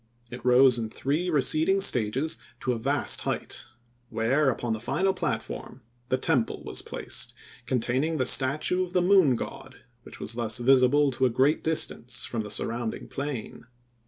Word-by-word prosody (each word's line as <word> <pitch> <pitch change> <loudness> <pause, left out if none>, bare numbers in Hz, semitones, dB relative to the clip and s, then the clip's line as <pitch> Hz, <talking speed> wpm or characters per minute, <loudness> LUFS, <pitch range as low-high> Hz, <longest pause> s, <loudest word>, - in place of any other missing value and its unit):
It 125 - -8
rose 125 0 +5
in 110 -1 -3
three 150 +10 -2
receding 160 +5 +2
stages 130 - +1 0.2
to 130 - 0
a 115 - -4
vast 110 - +2
height, - - -3 0.4
where, 125 +6 +1
upon 120 -2 -2
the 110 - -4
final 190 - 0
platform, 130 - -5 0.3
the 130 - +2
temple 130 -4 -1
was - - -5
placed, - - -5 0.3
containing 130 +6 0
the 130 - 0
statue 145 +8 +3
of 180 0 -8
the 180 - +3
Moon 180 -8 +5
God, 130 +3 -8 0.2
which - - -13
was 115 - -2
thus 115 -2 0
visible 135 +3 +4
to 130 +1 +1
a - - 0
great 135 +6 +1
distance 125 -6 -1
from 115 - -3
the 105 - -7
surrounding 115 +2 -4
plain. 135 -6 -6
130 Hz, 160 wpm, -26 LUFS, 120-155 Hz, 0.4 s, rose